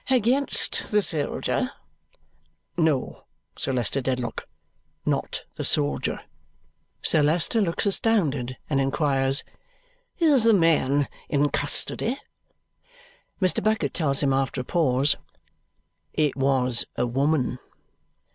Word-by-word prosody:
"Against 260 +2 +1
the 210 -1 +2
soldier?" 150 -6 -1 1.0
"No, 160 -6 -1 0.3
Sir - - -3
Leicester 125 +2 -1
Dedlock; 125 -2 -3 0.6
not - - -2
the - - -3
soldier." 145 -1 0 0.8
Sir 155 - +4
Leicester 165 +9 +2
looks 170 +1 0
astounded 155 - +1
and 140 -2 0
inquires, 135 -1 +2 0.7
"Is 300 - +4
the 225 -2 +6
man 145 -5 +2 0.2
in 145 -1 +1
custody?" 225 - +1 1.2
Mr. 185 -2 +2
Bucket 215 0 0
tells 145 -5 +2
him, 135 -1 +2
after 135 -1 -1
a - - -7
pause, 140 -2 +1 1.0
"It 150 -3 0
was 130 -3 +2
a 120 - 0
woman." 130 0 0
145 Hz, 105 wpm, -24 LUFS, 135-180 Hz, 1.2 s, the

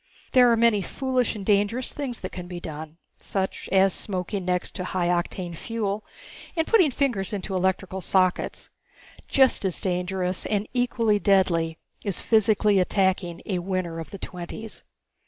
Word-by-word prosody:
There 250 -2 +6
are 230 - +4
many 225 -3 +4
foolish 255 +2 -1
and 200 -2 -6
dangerous 205 +5 +1
things 265 -5 -4
that 185 - -5
can 180 -1 -7
be 175 -1 -6
done, 155 -1 -8 0.2
such 190 -1 -3
as 190 -1 +4
smoking 190 0 -3
next 180 0 -1
to 185 - -4
high 180 -1 -1
octane 175 0 -1
fuel 210 +1 -3 0.5
and 325 - +2
putting 370 -8 +5
fingers 240 -8 -1
into 195 -1 -3
electrical 190 0 0
sockets. 185 -1 0 0.6
Just 265 -5 +4
as 190 -3 -1
dangerous, 180 0 -1
and 205 0 0
equally 235 -4 +2
deadly, 175 -5 +2 0.3
is 200 -4 -1
physically 215 -2 +3
attacking 185 -2 +1
a 185 -3 -1
Winner 175 -2 -2
of 165 - -7
the 200 - -8
Twenties. 185 +4 -7
195 Hz, 155 wpm, -25 LUFS, 180-220 Hz, 0.6 s, There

